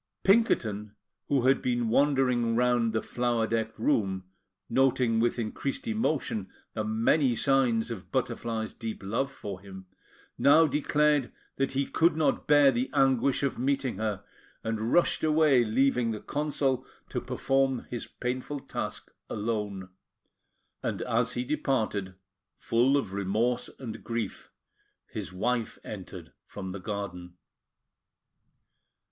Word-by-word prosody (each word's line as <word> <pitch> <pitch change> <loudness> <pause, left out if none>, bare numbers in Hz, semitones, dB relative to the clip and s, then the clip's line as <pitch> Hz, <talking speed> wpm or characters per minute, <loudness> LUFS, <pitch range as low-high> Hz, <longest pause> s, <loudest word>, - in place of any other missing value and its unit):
Pinkerton, 110 - +2 0.3
who 135 -4 +2
had 135 +1 +4
been 120 -2 0
wandering 125 -2 +2
round 120 -1 +2
the 110 - -1
flower 120 -2 0
decked 110 0 -2
room, 95 -4 +1 0.4
noting 125 -3 +2
with 120 +2 +1
increased 120 - -3
emotion 155 - -1 0.2
the 110 - -2
many 115 +5 +2
signs 120 -3 +2
of 105 -5 -7
Butterfly's 115 -3 -2
deep 115 -4 -6
love 115 +8 -1
for 100 -8 -7
him, 95 -1 -10 0.5
now 155 +3 +6
declared 150 -1 +2 0.3
that 135 0 0
he 135 +1 +1
could 165 +4 +2
not 155 - +1
bear 145 -2 +6
the 125 +1 -1
anguish 135 0 +3
of 140 - -1
meeting 135 -3 0
her, 105 -3 -2 0.4
and 110 +1 -2
rushed 175 - +3
away, 155 -5 +4
leaving 125 +1 +2
the 110 -1 -3
Consul 140 -3 -1 0.3
to - - -2
perform 135 -2 0
his 120 - -4
painful 130 +3 -4
task - - -5 0.2
alone; 105 -3 -3 0.9
and - - -2
as 125 +1 +1
he 125 - -1
departed, 125 -9 -1 0.4
full 125 +5 +3
of 115 -9 -3
remorse 105 +5 0
and 120 -5 -7
grief, 115 -3 -4 0.6
his - - -4
wife 115 +5 -1
entered - - -8
from 95 -2 -6
the 100 - -6
garden. 90 -3 -6
120 Hz, 130 wpm, -28 LUFS, 110-135 Hz, 0.9 s, now